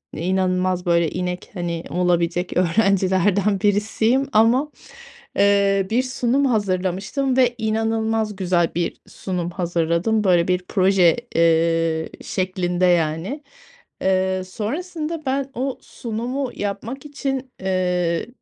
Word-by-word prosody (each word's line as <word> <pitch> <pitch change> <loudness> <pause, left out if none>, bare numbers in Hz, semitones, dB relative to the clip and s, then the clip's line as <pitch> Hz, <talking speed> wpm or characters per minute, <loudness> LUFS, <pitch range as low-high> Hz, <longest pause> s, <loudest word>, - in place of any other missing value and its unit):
inanılmaz, 185 0 0
böyle, 170 -2 +2
inek, 180 0 -4
hani, 170 -2 -3
olabilecek 175 0 0
öğrencilerden 195 +1 +2
birisiyim 220 +6 +1
ama, 240 +7 +3 0.7
eee, 200 -1 +3
bir 250 +3 +2
sunum 255 +2 0
hazırlamıştım 205 +4 0
ve 245 -2 +3
inanılmaz 220 -1 0
güzel 180 -3 +1
bir 170 -1 -2
sunum 180 -2 -4
hazırladım. 175 +4 0
Böyle, 175 -3 +3
bir 180 0 +1
proje, 185 -3 +4 0.2
eee, 165 -1 +2
şeklinde, 185 -3 -1
yani. 175 - 0 0.6
Eee, 190 0 +1
sonrasında 310 - -4
ben 270 +1 -1
o 265 +1 -3
sunumu 245 +3 -4
yapmak 220 +7 -5
için, 270 -2 -4
eee, 180 -2 0
190 Hz, 105 wpm, -21 LUFS, 180-230 Hz, 0.7 s, proje